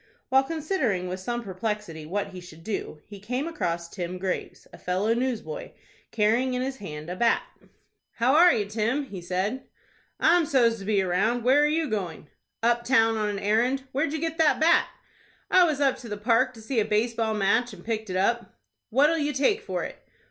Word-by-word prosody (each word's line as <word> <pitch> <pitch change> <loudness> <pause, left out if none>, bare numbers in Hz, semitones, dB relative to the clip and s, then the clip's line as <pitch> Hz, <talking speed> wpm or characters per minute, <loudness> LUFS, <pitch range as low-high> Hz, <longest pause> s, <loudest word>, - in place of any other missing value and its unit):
While 265 +1 +5
considering 270 - -1
with 185 +1 -4
some 240 +5 -3
perplexity 195 -5 -4
what 200 +4 -2
he 185 -2 -9
should 165 -2 -13
do, 175 -6 -5
he 205 -1 -11
came 250 +9 -3
across 170 - -2
Tim 180 0 -5
Graves, 185 0 -4
a - - -12
fellow 190 +5 0
newsboy, 255 - -3 0.4
carrying 230 +4 +1
in 250 - -1
his 265 0 -4
hand 155 -8 -8
a 180 - -4
bat. 230 +4 +2 0.7
"How 245 +3 +2
are 345 +3 +7
you, 210 -8 0
Tim?" 225 +7 -1
he 200 -9 -8
said. 190 +9 -2 0.6
"I'm 335 -1 +4
so's 235 -5 +3
to 195 - -8
be 205 -2 +2
round. 215 +7 +1
Where 265 +4 +5
are 295 - +4
you 315 +1 0
going?" 185 -8 -4 0.3
"Up 235 0 +2
town 225 -3 +3
on 215 -1 0
an 205 - -3
errand. 235 +7 +1
Where'd 285 +3 0
you 315 - -2
get 325 +1 -3
that 315 -2 +4
bat?" 320 +2 +4 0.6
"I 365 -1 +7
was 305 -4 0
up 275 -2 +2
to 235 - -10
the 210 - -4
Park 240 +4 +2
to 225 - -12
see 235 +1 0
a 210 - +2
base 220 +3 +1
ball 225 -1 -1
match, 215 +4 +2
and 185 -4 -13
picked 220 -2 -3
it 185 - -1
up." 235 +5 0 0.3
"What'll 295 +7 +3
you 295 0 -1
take 290 - +2
for 445 - -3
it?" - - -7
230 Hz, 205 wpm, -26 LUFS, 195-270 Hz, 0.7 s, are